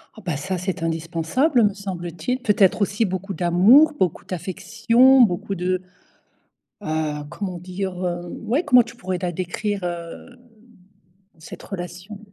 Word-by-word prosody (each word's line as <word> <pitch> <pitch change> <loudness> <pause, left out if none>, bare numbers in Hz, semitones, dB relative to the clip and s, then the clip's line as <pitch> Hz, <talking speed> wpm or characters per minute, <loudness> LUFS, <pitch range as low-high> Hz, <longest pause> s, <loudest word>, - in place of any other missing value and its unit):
Oh 220 - -12
bah, 165 -5 -2
ça 185 +6 -3
c'est 180 -1 -4
indispensable, 165 - +1
me 205 -1 +2
semble-t-il. 185 +3 -4
Peut-être 210 -4 +3
aussi 205 +3 +1
beaucoup 190 +1 -4
d'amour, 195 - +5
beaucoup 180 -1 0
d'affection, 225 +8 +3
beaucoup 195 -2 +1
de 185 0 -1 1.0
heu, 155 -1 -2
comment 185 -1 -5
dire? 185 +2 -4
Hem, 175 0 -4
ouais, 265 +10 +1
comment 250 -5 +6
tu 235 +1 -13
pourrais 185 -6 -4
la 180 - -1
décrire, 190 +3 -3
hem, 175 +8 -7 1.0
cette 160 - -11
relation? 180 +2 -8
185 Hz, 135 wpm, -22 LUFS, 175-215 Hz, 1.0 s, comment